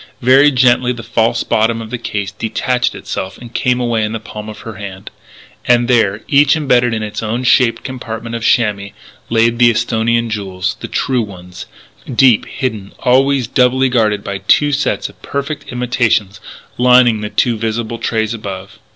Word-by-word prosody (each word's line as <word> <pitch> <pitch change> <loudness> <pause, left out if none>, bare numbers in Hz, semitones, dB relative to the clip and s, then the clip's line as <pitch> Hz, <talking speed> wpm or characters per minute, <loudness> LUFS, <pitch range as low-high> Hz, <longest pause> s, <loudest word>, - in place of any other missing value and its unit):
Very 135 +4 +6
gently 125 -2 +3
the 120 -1 -9
false 115 0 0
bottom 115 +1 +1
of 110 -1 -8
the 125 - -4
case 105 -3 -4
detached 120 +3 -1
itself 95 +1 -5
and 120 -1 -12
came 125 +1 +1
away 120 -3 0
in 105 +1 -2
the 115 - -3
palm 105 0 -9
of 105 - -10
her 115 -1 -9
hand. 100 -2 -8 0.6
And 120 -1 +3
there, 110 -4 +2
each 145 +1 +4
embedded 125 -6 +2
in 110 - -3
its 105 0 -5
own 115 +3 -2
shaped 125 -1 +3
compartment 115 -3 -6
of 115 - -4
chamois, 105 -4 +1 0.4
lay 115 0 +3
the 120 0 +4
Esthonian 115 0 0
jewels 95 -3 -3
the - - -6
true 130 -2 0
ones 90 -4 -9 0.4
deep 125 -2 +4
hidden, 110 -7 -4
always 135 +1 +2
doubly 130 +2 +2
guarded 110 -4 +1
by 100 0 -4
two 145 +7 +2
sets 145 +1 -1
of - - -17
perfect 140 +1 -5
imitations 120 -5 0 0.4
lining 125 -3 +5
the 105 - -4
two 120 +1 +1
visible 115 +1 -3
trays 110 -1 -1
above. 100 -1 -8
115 Hz, 170 wpm, -15 LUFS, 110-125 Hz, 0.6 s, Very